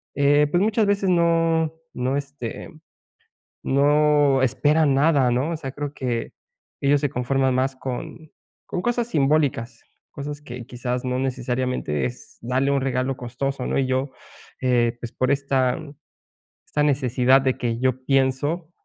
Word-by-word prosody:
eh, 145 +1 +4
pues, 175 - +2
muchas 215 +1 +2
veces 200 -1 +1
no 165 -2 +2 0.2
no, 130 +2 -1
este, 140 -4 -6 1.0
no 145 0 +3
esperan 140 +4 +3
nada, 140 -3 +3
¿no? 130 +6 0
O - - -2
sea, 135 -4 -6
creo 145 0 -5
que 120 -4 -3 0.5
ellos 140 +1 +3
se 145 -2 0
conforman 130 +1 0
más 130 +1 0
con 135 +5 -6 0.4
con - - -3
cosas 240 -1 0
simbólicas, 140 - 0 0.3
cosas 145 +1 -6
que, 125 -4 -8
quizás, 125 0 -4
no, 125 0 -1
necesariamente, 125 - -2
es 65 - -7
darle 130 +4 0
un 140 - +2
regalo 130 0 -1
costoso, 130 +2 -4
¿no? - - -1
Y 135 - +1
yo, 130 +1 -1 0.5
eh, 120 -2 +2
pues, 120 - -6
por 130 0 0
esta 135 -2 +1 0.9
esta 150 - 0
necesidad 130 -2 +3
de 130 -1 +1
que 115 -1 -2
yo 130 0 0
pienso 140 +5 +1
135 Hz, 145 wpm, -23 LUFS, 125-145 Hz, 1.0 s, eh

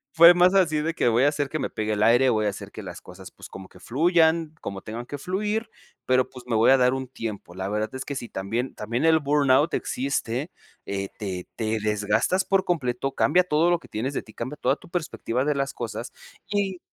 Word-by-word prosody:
Fue 170 +1 +9
más 180 +2 +4
así, 170 -6 +3
de 160 +2 -1
que 165 - -1
voy 120 +1 +3
a 140 - +5
hacer 145 -1 -1
que 155 +2 -3
me - - -2
pegue 110 0 -2
el 105 0 0
aire, 120 +4 +5
voy 110 -2 +1
a - - +3
hacer 100 - -7
que - - -8
las - - -8
cosas, - - -12
pues, - - -13
como 95 -1 -10
que - - -17
fluyan, 160 +2 +2
como 100 -1 -6
tengan 115 +4 -7
que 145 - -6
fluir, 210 +7 -2 0.3
pero 130 0 +2
pues, 125 -2 -12
me 115 - +1
voy 115 +4 +5
a - - +7
dar 125 0 +3
un 130 0 -4
tiempo. 110 -7 -7
La 95 +1 -4
verdad 105 +3 -2
es 130 - -5
que 140 - -5
sí, 120 - -5
también 115 +7 -3
también 115 +6 -3
el 160 -1 +5
burnout 145 +1 +3
existe, 135 +2 -2 0.3
eh, 100 0 -4
te 95 -4 -4
te 110 0 -1
desgastas 105 - +1
por 195 -1 +2
completo, 135 -6 -1
cambia 180 +6 +3
todo 165 0 +2
lo 175 - +3
que - - -16
tienes 125 +6 -3
de - - -3
ti, 110 - -17
cambia 130 +5 -5
toda 130 -1 +1
tu - - -17
perspectiva 150 -7 -2
de 150 0 +1
las 135 -1 -1
cosas, 120 0 -6 0.4
y 200 -3 -1
130 Hz, 235 wpm, -25 LUFS, 115-160 Hz, 0.4 s, Fue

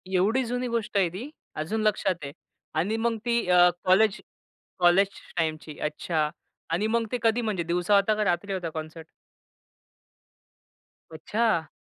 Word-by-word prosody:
एवढी 220 +8 +3
जुनी 245 +1 -2
गोष्ट 230 -3 -2
आहे 185 -3 +3
ती, 220 - -7 0.3
अजून 190 +9 -2
लक्षात 210 -4 +1
आहे. 140 - -5 0.4
आणि 200 +8 0
मग 230 0 0
ती 235 -3 +1
अ, 180 0 +7
कॉलेज 195 +3 +4 0.6
कॉलेज 180 +3 +5 0.3
टाइमची, 155 -2 -2
अच्छा. 150 0 -1 0.4
आणि 175 +6 0
मग 230 0 +1
ते 250 - 0
कधी, 225 +2 +3
म्हणजे 205 -6 -1
दिवसा 175 +4 +1
होता 200 +2 +3
का 215 - 0
रात्री 195 +1 0
होता 175 -3 -3
कॉन्सर्ट? 160 +1 -8 2.0
अच्छा! 170 -1 0
195 Hz, 140 wpm, -26 LUFS, 165-220 Hz, 2.0 s, अ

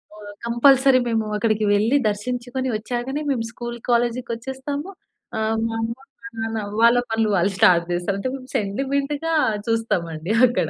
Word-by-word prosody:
ఆహ్, 205 -1 -10
కంపల్సరీ 260 +2 +5
మేము 225 -1 0
అక్కడికి 215 0 +1
వెళ్లి 215 +6 +2
దర్శించుకొని, 245 +5 -3
వచ్చాకనే 245 +6 -3
మేము 235 -4 -1
స్కూలు, 240 0 -6
కాలేజీకి 240 +1 +1
వచ్చేస్తాము. 265 +7 -5 0.5
ఆహ్, 220 0 0
మా 225 - -4
అమ్మ, 225 +1 -2 0.3
మా - - -8
నాన్న 225 0 -2 0.2
వాళ్ళ 235 +1 +6
పనులు 225 -1 +1
వాళ్ళు 185 +3 +2
స్టార్ట్ 170 -2 +5
చేస్తారు. 175 +3 -1
అంటే 255 - -2 0.3
సెంటిమెంట్‌గా 275 +9 -1 0.4
చూస్తామండి 175 -6 -1
అక్కడ. 245 - -1
230 Hz, 140 wpm, -22 LUFS, 215-260 Hz, 0.5 s, వాళ్ళ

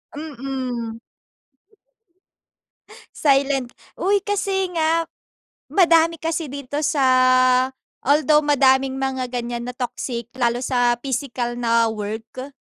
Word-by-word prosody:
Mm. 255 -6 -5 2.2
Silent 275 -3 +2 0.2
uy, 400 +3 +1
kasi 385 -2 -1
nga, 330 0 +1 0.6
madami 335 -3 +4
kasi 325 -1 -3
dito 280 +1 -5
sa, 290 -2 +1 1.0
although 300 +1 +3
madaming 270 -2 +3
mga 265 -2 -2
ganyan 240 -1 -4
na 250 - -9
toxic, 245 -1 -4
lalo 240 -2 0
sa 245 -1 +1
physical 245 -1 -3
na 230 -1 +2
work. 220 +4 -5
265 Hz, 95 wpm, -21 LUFS, 240-305 Hz, 2.2 s, madami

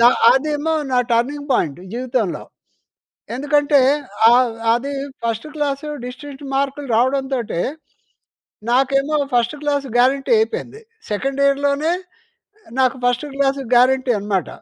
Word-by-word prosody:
The - - +4 0.3
అదేమో 300 +4 0 0.2
నా 250 - +3
turning 285 +5 0
point 150 +2 0
జీవితంలో. 240 -6 -2 0.9
ఎందుకంటే 290 +1 +3 0.5
ఆహ్, 245 -1 +4 0.2
అది 275 +4 -3 0.3
ఫస్ట్ 230 +4 -2
క్లాస్ 285 -1 -2 0.2
డిస్టింక్ట్ 280 +2 -9
మార్కులు 275 0 -2
రావడంతోటే, 260 -6 0 1.1
నాకేమో 275 +3 +2 0.2
ఫస్ట్ 240 +4 +1
క్లాస్ 285 -1 0
గ్యారంటీ 265 - +2
అయిపోయింది. 445 0 -3 0.3
సెకండ్ 270 +6 -2
ఇయర్‍లోనే 280 +3 +1 0.9
నాకు 260 0 +3
ఫస్ట్ 245 +3 +1
క్లాస్ 275 0 +1 0.2
గ్యారంటీ 255 +1 +4
అనమాట. 195 -4 -1
270 Hz, 105 wpm, -19 LUFS, 245-285 Hz, 1.1 s, The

